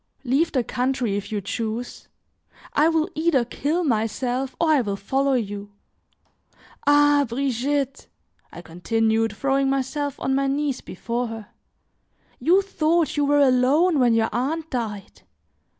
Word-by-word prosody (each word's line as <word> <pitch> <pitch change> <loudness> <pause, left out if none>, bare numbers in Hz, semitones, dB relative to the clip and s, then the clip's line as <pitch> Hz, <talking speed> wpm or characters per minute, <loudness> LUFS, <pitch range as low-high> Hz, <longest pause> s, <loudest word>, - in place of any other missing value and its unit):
"Leave 280 +6 +1
the 255 -3 +1
country 250 -4 -1
if 205 +1 -5
you 210 - -1
choose; 225 +3 -5 0.7
I 305 +2 +4
will 320 0 +1
either 310 -6 +1
kill 305 +8 -1
myself 250 +1 -1
or 325 -2 +3
I 295 -4 +4
will 205 -4 -2
follow 270 +7 0
you. 205 -3 -4 1.1
Ah! 290 0 +5
Brigitte," 275 +2 -2 0.4
I 175 - -10
continued, 225 +6 0
throwing 275 +1 +1
myself 275 +1 -2
on 265 - -1
my 275 0 +1
knees 280 -1 -1
before 235 +6 -4
her, 225 -2 -8 0.9
"you 355 +9 +3
thought 335 -3 0
you 290 -1 +1
were 290 0 +3
alone 280 +6 +3
when 240 -3 +4
your 225 0 +2
aunt 310 +6 -2
died! 215 -5 -5
265 Hz, 135 wpm, -23 LUFS, 225-290 Hz, 1.1 s, Ah